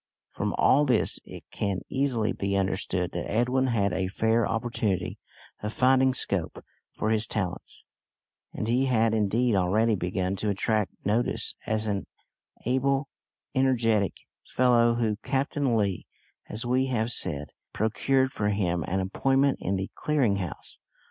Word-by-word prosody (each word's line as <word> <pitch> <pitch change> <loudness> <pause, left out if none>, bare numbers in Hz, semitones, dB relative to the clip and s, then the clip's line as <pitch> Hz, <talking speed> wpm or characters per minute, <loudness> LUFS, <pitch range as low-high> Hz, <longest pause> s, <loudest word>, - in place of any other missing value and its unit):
From - - -2
all 145 +2 +4
this 125 -5 +2
it - - -10
can 100 -2 -2
easily 130 -5 0
be 100 0 -1
understood 95 -2 -1
that 85 - -4
Edwin 125 +4 +1
had 100 -6 +1
a 95 0 0
fair 110 +3 +1
opportunity 115 -4 -2 0.4
of 105 +1 -3
finding 130 0 +4
scope 95 -9 -2 0.3
for 110 - 0
his 110 0 +1
talents; 90 -5 -4 0.7
and 110 - -4
he 125 +3 +2
had 115 -3 +2
indeed 110 +3 +2
already 105 +4 +2
begun 90 0 -1
to 105 - -1
attract 105 +1 -1
notice 110 +4 0
as 110 0 0
an 100 -2 -2 0.6
able, 135 +3 +1 0.4
energetic 115 -7 +2 0.3
fellow, 120 -2 +3
when 110 -3 0
Captain 135 -2 0
Lee, 100 -4 -1 0.4
as 110 +3 -3
we 130 +2 +2
have 120 -2 0
said, 75 - -1 0.2
procured 130 +5 +1
for 105 -4 -1
him 90 -5 0
an 95 +2 0
appointment 135 +8 +1
in 95 - -1
the 95 0 -3
Clearing 135 -10 +1
House. 90 -5 -7
110 Hz, 140 wpm, -27 LUFS, 100-125 Hz, 0.7 s, all